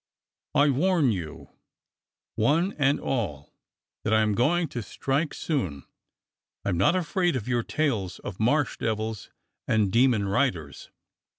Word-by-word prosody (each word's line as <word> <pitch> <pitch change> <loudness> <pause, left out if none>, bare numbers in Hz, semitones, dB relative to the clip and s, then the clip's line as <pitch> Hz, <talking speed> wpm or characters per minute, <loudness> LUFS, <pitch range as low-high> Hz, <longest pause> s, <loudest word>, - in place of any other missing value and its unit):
I 145 0 +5
warn 155 -1 +2
you, 80 -5 -6 0.8
one 155 - +2
and 140 0 +3
all, 90 - -3 0.5
that 110 - -1
I'm 110 -1 +3
going 160 - +2
to 120 - -4
strike 140 +7 -1
soon. 90 - -3 0.8
I'm 95 - 0
not 95 - +3
afraid 180 -1 0
of 120 -3 -3
your 120 -2 +1
tales 115 - -1
of 95 - -8
Marsh 130 +5 +1
devils 110 -1 -3 0.4
and 105 -3 +2
demon 115 -3 +3
riders. 95 - -1
120 Hz, 125 wpm, -26 LUFS, 100-145 Hz, 0.8 s, I